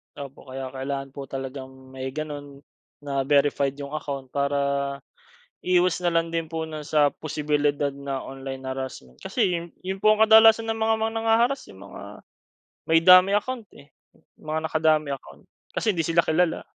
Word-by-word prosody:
Opo, 140 -1 -10
kaya 130 0 -6
kailangan 135 +1 -4
po 135 0 -8
talagang 130 0 -8
may 130 0 -5
ganoon 145 0 -7 0.4
na 140 -2 -2
verified 140 -1 +2
iyong 140 0 -8
account. 140 -4 -5
Para, 140 0 0 1.1
iwas 180 -1 +3
na 175 -1 0
lang 165 0 +1
din 165 -1 -2
po 160 0 -4
'no 160 -1 -6
sa 145 -1 +3
posibilidad 145 -1 -1
na 140 -1 -5
online 135 0 -7
harassment. 130 - -6
Kasi 210 - 0
iyon, 170 -1 -2 0.2
yung 190 +1 -4
po 215 +2 +5
ang 215 - +2
kadalasan 225 +1 +6
na 225 - -2
mga 220 0 +2
mang 220 0 -1
nanghaharass 225 +4 +1
iyong 95 -1 -14
mga - - -10 0.9
may 165 - +6
dummy 185 +3 +7
account 235 -1 -5
eh. 145 +1 -18 0.5
Mga 155 +1 -2
naka-dummy 155 -2 +1
account. 70 - -11 0.2
Kasi 215 - 0
hindi 170 - 0
sila 165 +1 +2
kilala. 165 +1 +1
150 Hz, 165 wpm, -25 LUFS, 135-180 Hz, 1.1 s, dummy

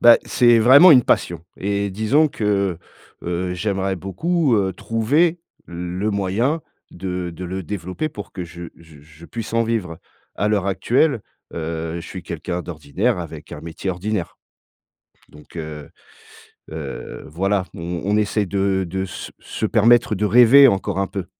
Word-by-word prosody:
Bah, 120 0 +8
c'est 120 -2 +4
vraiment 140 +10 +8
une 125 -4 +8
passion 85 -2 0
et 100 0 -1
disons 125 +10 +2
que, 100 -7 -1 0.4
heu, 90 +1 -2
j'aimerais 95 0 -1
beaucoup, 135 - 0
heu, 95 -2 +1
trouver 145 - +1 0.3
le 90 +4 -3
moyen 105 - 0 0.3
de 90 -1 -4
de 85 +2 -8
le 95 +1 -4
développer 95 - -4
pour 105 - -9
que 90 - -5
je 85 +1 -9
je 80 -3 -17
je 75 +3 -16
puisse 115 -1 -6
en 115 - +3
vivre. 100 -8 -2 0.4
À 105 - 0
l'heure 100 -3 +1
actuelle, 120 +5 +1 0.3
heu, 80 0 -4
je 85 - -7
suis - - -8
quelqu'un 90 0 -4
d'ordinaire 90 - -2
avec 80 -2 -8
un - - -7
métier 85 +3 -6
ordinaire. 95 0 -3 0.9
Donc, 75 +3 -16
heu, 75 -2 -7 0.8
heu, 80 -4 -7
voilà, 95 +4 0
on 85 -1 -5
on 105 +1 +1
essaye 105 -1 +1
de 95 0 0
de 95 +2 -2
se 90 - -8
se 110 - -3
permettre 115 +2 +4
de 105 +2 -1
rêver 130 +3 +8
encore 95 -2 -1
un 100 - +1
peu. 95 -3 -5
95 Hz, 155 wpm, -21 LUFS, 85-110 Hz, 0.9 s, Bah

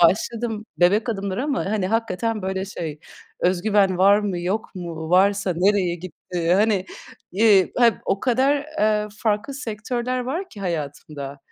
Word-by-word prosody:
başladım, 220 +3 +1
bebek 205 +6 +3
adımları 200 +3 -2
ama, 285 -3 -1
hani, 200 -2 0
hakikaten 225 0 -1
böyle 190 0 -2
şey, 160 -6 -6 0.4
öz 180 0 +1
güven 200 -4 +3
var 200 +2 +6
mı, 200 -4 -2
yok 195 +5 -3
mu, 165 -3 -6
varsa 195 +1 +3
nereye 185 -1 +2
gitti, 175 0 -2
hani, 205 -1 +2 0.5
eee, 200 -1 +4
ha 245 - +6 0.2
o 195 - 0
kadar, 265 +3 +2 0.2
eee, 210 0 +2
farklı 220 +4 -1
sektörler 245 0 -3
var 325 +10 -3
ki 205 - -12
hayatımda, 145 -4 -5
200 Hz, 145 wpm, -23 LUFS, 180-225 Hz, 0.5 s, var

